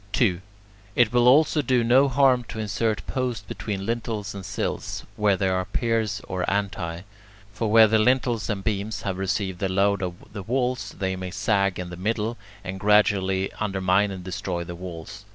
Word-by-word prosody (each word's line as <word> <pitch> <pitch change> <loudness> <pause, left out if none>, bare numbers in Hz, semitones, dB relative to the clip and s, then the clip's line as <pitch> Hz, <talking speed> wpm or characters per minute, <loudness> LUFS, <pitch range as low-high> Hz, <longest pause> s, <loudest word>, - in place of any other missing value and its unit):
2. 95 -7 +2 0.5
It 120 -1 +3
will 120 0 +4
also 150 +3 +5
do 125 -3 +2
no 130 +4 +5
harm 130 -2 +3
to 115 - -8
insert 110 -1 -1
posts 125 -5 -2
between 100 -3 -4
lintels 110 -3 -3
and 100 -1 -7
sills - - -4
where 105 -2 +2
there 95 -1 +1
are 95 - 0
piers 110 -1 -1
or 90 -1 -2
antae; 95 -4 -2 0.5
for 110 0 -2
where 110 +1 +8
the 110 0 +3
lintels 120 -1 +1
and 100 -3 -2
beams 105 +1 -2
have 95 -3 -3
received 95 -1 -2
the 95 - -1
load 100 +1 +2
of 90 0 -6
the 100 - -5
walls, 125 -1 -2
they 95 -1 -1
may 95 0 -5
sag 100 0 +1
in 90 -1 -5
the 90 - -7
middle, 110 +4 -1 0.3
and 95 0 -5
gradually 95 -2 +2
undermine 95 -1 +1
and 95 -2 -7
destroy 90 -1 -3
the 85 - -7
walls. 85 +2 -8
100 Hz, 180 wpm, -25 LUFS, 95-115 Hz, 0.5 s, where